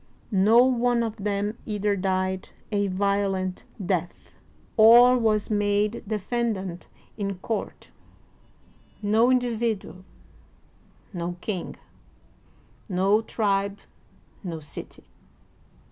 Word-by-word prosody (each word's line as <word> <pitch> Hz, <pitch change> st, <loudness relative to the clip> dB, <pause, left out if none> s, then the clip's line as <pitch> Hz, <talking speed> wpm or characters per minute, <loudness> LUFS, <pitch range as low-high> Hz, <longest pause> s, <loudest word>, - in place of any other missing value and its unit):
• -, -, -34 dB, 0.3 s
No 215 Hz, +5 st, +5 dB
one 245 Hz, -2 st, +2 dB
of 225 Hz, -1 st, -4 dB
them 205 Hz, +2 st, -2 dB
either 210 Hz, -1 st, 0 dB
died 185 Hz, 0 st, -1 dB, 0.2 s
a 205 Hz, -1 st, +1 dB
violent 195 Hz, -1 st, -1 dB, 0.2 s
death, 175 Hz, -2 st, -3 dB, 0.4 s
or 240 Hz, +3 st, +8 dB
was 220 Hz, -3 st, +1 dB
made 205 Hz, +1 st, +1 dB
defendant 210 Hz, -4 st, -3 dB, 0.3 s
in 200 Hz, -1 st, -2 dB
court 215 Hz, +4 st, -5 dB, 0.6 s
— -, -, -32 dB
no 230 Hz, +3 st, +5 dB
individual, 230 Hz, -6 st, -1 dB, 1.1 s
no 175 Hz, 0 st, -4 dB
king, 190 Hz, -3 st, -4 dB, 1.1 s
no 195 Hz, +3 st, +2 dB
tribe, 200 Hz, -3 st, -1 dB, 0.7 s
no 170 Hz, -4 st, -5 dB
city. 145 Hz, -2 st, -9 dB
205 Hz, 95 wpm, -25 LUFS, 190-225 Hz, 1.1 s, or